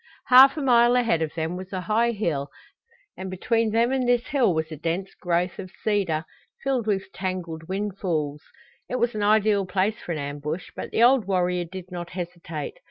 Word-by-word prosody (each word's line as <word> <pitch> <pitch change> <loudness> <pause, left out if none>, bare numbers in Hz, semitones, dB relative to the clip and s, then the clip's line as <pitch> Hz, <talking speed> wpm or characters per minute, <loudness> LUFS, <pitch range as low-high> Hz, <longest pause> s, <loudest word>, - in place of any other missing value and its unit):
Half 265 +3 +8
a 300 - -2
mile 240 -1 +5
ahead 230 -10 +2
of 160 -1 -2
them 165 +1 -2
was 185 +1 -8
a 185 -2 -3
high 220 +6 +2
hill 170 -11 -2 0.7
and 190 0 -6
between 225 +4 0
them 230 +3 +2
and 260 -2 0
this 245 0 +2
hill 265 -8 +3
was 160 -1 -2
a - - -4
dense 170 +5 -3
growth 175 0 -1
of 185 -1 -6
cedar, 190 -7 0 0.4
filled 260 -5 0
with 195 -2 -1
tangled 175 -4 -4
windfalls. 185 -7 -2 0.5
It - - -2
was 240 -1 +1
an 215 - -3
ideal 205 -1 +3
place 195 +4 0
for - - -6
an 165 - -2
ambush, 145 +4 -5
but - - -5
the 230 - +2
old 250 -3 +5
warrior 180 -2 +1
did 185 +1 -9
not 175 -1 -6
hesitate. 170 -4 -6
190 Hz, 190 wpm, -25 LUFS, 170-225 Hz, 0.7 s, Half